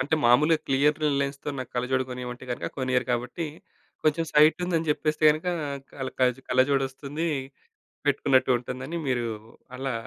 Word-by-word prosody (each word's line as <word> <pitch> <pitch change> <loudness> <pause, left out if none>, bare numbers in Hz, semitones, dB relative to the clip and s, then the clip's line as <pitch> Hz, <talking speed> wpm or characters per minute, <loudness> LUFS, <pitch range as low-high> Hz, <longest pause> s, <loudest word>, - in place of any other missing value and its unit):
అంటే 140 +4 +1
మాములుగా 150 +7 +5
క్లియర్ 140 +2 +3 0.2
లైన్స్‌తో 140 +1 -3
నాకు 130 -1 -6
కళ్ళజోడు 130 +1 0
కొనిమంటే 125 0 -6
గనక 120 - -3
కొనియ్యరు 130 -1 +1
గాబట్టి, 125 +7 -2 0.6
కొంచెం 155 +2 +2
సైటు 150 +1 +6
ఉందని 165 -3 -1
జెప్పేస్తే 155 +1 0
గనక 155 +3 -2 0.5
కళ 130 -2 -4
కలజ్ 125 0 +2
కళ్ళజోడోస్తుంది. 135 +4 0 0.8
పెట్టుకున్నట్టు 135 -2 +3
ఉంటుందని 130 +6 -5
మీరు 120 -2 0 0.5
అలా 135 0 -2
135 Hz, 130 wpm, -26 LUFS, 125-150 Hz, 0.8 s, సైటు